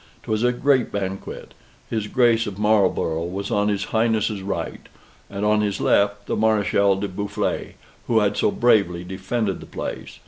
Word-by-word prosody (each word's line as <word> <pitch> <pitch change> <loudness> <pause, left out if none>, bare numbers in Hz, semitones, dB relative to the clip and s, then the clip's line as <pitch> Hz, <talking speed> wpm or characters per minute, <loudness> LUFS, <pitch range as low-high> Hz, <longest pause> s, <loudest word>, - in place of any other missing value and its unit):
'Twas 110 0 -1
a 125 +1 +3
great 130 0 +2
banquet. 95 -1 -5 0.3
His 110 -2 -2
Grace 120 -2 +3
of 100 -2 -6
Marlborough 100 -6 +2
was 95 +3 -4
on 105 0 +2
his 100 -1 0
Highness's 110 -2 +1
right, 100 +1 -4 0.4
and 100 +1 -3
on 105 0 +3
his 100 -2 -1
left 100 0 +2
the - - -2
Mareschal 105 -2 +2
de 100 - -2
Boufflers, 100 +2 -3 0.3
who 115 - +2
had 105 -1 +2
so - - +2
bravely 100 -7 +2
defended 95 +2 -2
the - - -11
place. - - -6
105 Hz, 165 wpm, -23 LUFS, 100-110 Hz, 0.4 s, a